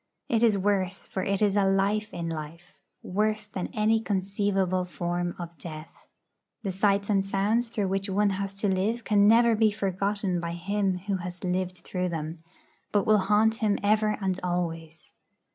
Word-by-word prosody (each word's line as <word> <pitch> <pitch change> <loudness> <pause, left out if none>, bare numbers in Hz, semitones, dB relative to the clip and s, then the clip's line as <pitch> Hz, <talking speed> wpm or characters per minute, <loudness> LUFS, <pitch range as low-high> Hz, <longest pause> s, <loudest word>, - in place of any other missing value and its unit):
It 225 -2 +2
is 225 -4 +4
worse; 195 -1 -1
for 190 - -3
it 195 +2 +1
is 205 -1 +2
a 205 - +4
life 195 +2 +1
in 170 -1 -4
life, 165 +2 -7 0.2
worse 215 +3 0
than 195 -3 -4
any 220 +1 +2
conceivable 195 -2 0
form 175 0 -3
of 170 -1 -8
death. 155 -1 -10 0.6
The 195 - -1
sights 200 +1 +1
and 200 -2 +2
sounds 205 +5 0
through 205 -4 -1
which 195 +1 -1
one 200 +1 +2
has 195 0 -3
to 205 +1 -1
live 205 +5 0
can 205 -2 +4
never 230 +1 +6
be 220 0 +4
forgotten 200 -1 -1
by 170 0 -4
him 190 +2 -1
who 200 -2 0
has 180 0 -7
lived 185 0 -1
through 180 -1 -2
them, 160 0 -5 0.5
but 205 -2 +2
will 215 -1 +5
haunt 210 +3 +3
him 215 -2 +1
ever 215 +1 +2
and 190 -2 -1
always. 165 -3 -4
195 Hz, 175 wpm, -27 LUFS, 180-210 Hz, 0.6 s, never